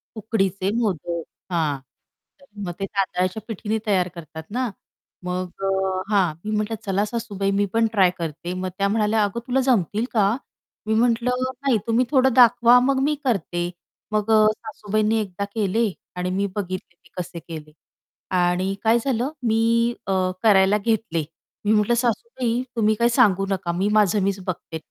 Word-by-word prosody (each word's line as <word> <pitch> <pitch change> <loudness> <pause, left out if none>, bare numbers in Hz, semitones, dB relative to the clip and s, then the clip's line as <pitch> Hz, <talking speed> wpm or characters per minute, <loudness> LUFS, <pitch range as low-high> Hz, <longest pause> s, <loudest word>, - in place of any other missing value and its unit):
उकडीचे 195 -3 -1
मोदक. 175 -6 -1 0.3
हां, 155 -5 0 0.6
तर - - -18 0.2
मग 175 - -3
ते 195 - -1
तांदळाच्या 185 0 -1
पिठीने 220 0 -2
तयार 185 -3 +2
करतात 160 -1 -9
ना. 250 +2 -1 0.5
मग 180 0 -3 0.2
अ, - - +1 0.4
हां. 190 -6 +3
मी 215 - -2
म्हटलं, 215 +1 -1
"चला 195 +1 +1
सासूबाई 205 -3 -2
मी 205 - +3
पण 225 0 +3
ट्राय 190 -4 +5
करते." 170 +2 -4
मग 185 0 -3
त्या 200 0 +2
म्हणाल्या, 215 +1 +2
"अगं, 205 +3 -1
तुला 255 +1 +2
जमतील 220 -3 +1
का?" 205 -4 +4 0.6
मी 220 - +2
म्हटलं, 240 +2 +2 0.2
"नाही, 270 -4 +3
तुम्ही 230 +2 +3
थोडं 265 -2 +4
दाखवा 245 0 +7
मग 265 +1 +2
मी 300 +2 +2
करते." 175 - -1 0.4
मग 215 +1 0
अ, 220 - +6 0.2
सासूबाईंनी 215 0 -1
एकदा 200 -1 -4
केले 220 +2 +1 0.3
आणि 180 0 -2
मी 200 +2 0
बघितले 185 -3 -5
ते 170 0 -25
कसे 175 -1 -5
केले. 155 -2 -9 0.7
आणि 180 +2 +1
काय 225 +1 +4
झालं? 260 +1 0
मी 230 +1 +2
अ, 195 - +1 0.3
करायला 200 -2 +5
घेतले. 210 -6 -1 0.4
मी 210 - +3
म्हटलं 210 +3 +3
"सासूबाई," 240 - -1
"तुम्ही 215 -1 +2
काही 235 +2 +3
सांगू 205 -6 +4
नका, 185 -3 -1
मी 185 +4 0
माझं 210 -1 +3
मीच 195 0 0
बघते, 170 -2 -4
210 Hz, 160 wpm, -23 LUFS, 185-230 Hz, 0.7 s, दाखवा